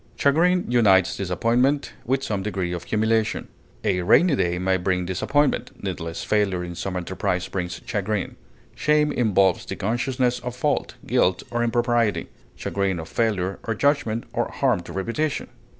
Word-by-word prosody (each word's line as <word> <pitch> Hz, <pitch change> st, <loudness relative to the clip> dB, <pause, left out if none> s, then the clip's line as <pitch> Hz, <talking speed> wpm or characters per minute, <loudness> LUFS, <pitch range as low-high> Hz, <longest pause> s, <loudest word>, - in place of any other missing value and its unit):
Chagrin 175 Hz, +6 st, +3 dB
unites 100 Hz, -7 st, +4 dB
disappointment 120 Hz, -, +1 dB
with 135 Hz, +2 st, 0 dB
some 105 Hz, -6 st, -2 dB
degree 95 Hz, -3 st, -2 dB
of 90 Hz, 0 st, -5 dB
humiliation. 110 Hz, +1 st, 0 dB, 0.3 s
A 95 Hz, -4 st, +1 dB
rainy 140 Hz, -, +5 dB
day 90 Hz, -6 st, 0 dB
may 95 Hz, +1 st, +1 dB
bring 90 Hz, 0 st, 0 dB
disappointment; 140 Hz, +11 st, +1 dB
needless 85 Hz, -4 st, -4 dB
failure 100 Hz, -4 st, +1 dB
in 85 Hz, 0 st, -6 dB
some 90 Hz, +2 st, -4 dB
enterprise 90 Hz, 0 st, -2 dB
brings 90 Hz, -2 st, -4 dB
chagrin. 105 Hz, -3 st, -2 dB, 0.4 s
Shame 150 Hz, 0 st, +2 dB
involves 100 Hz, -8 st, +2 dB
the -, -, -5 dB
consciousness 125 Hz, +3 st, 0 dB
of 125 Hz, 0 st, -6 dB
fault, 145 Hz, +3 st, -1 dB
guilt, 95 Hz, 0 st, +2 dB
or 120 Hz, 0 st, 0 dB
impropriety; 120 Hz, -2 st, +1 dB, 0.3 s
chagrin 100 Hz, -2 st, -1 dB
of 80 Hz, -, -7 dB
failure 100 Hz, -5 st, 0 dB
of 115 Hz, -2 st, -2 dB
judgment, 140 Hz, -5 st, +1 dB
or -, -, 0 dB
harm -, -, +1 dB
to 85 Hz, -, -10 dB
reputation. 115 Hz, -, -2 dB
105 Hz, 150 wpm, -24 LUFS, 95-125 Hz, 0.4 s, rainy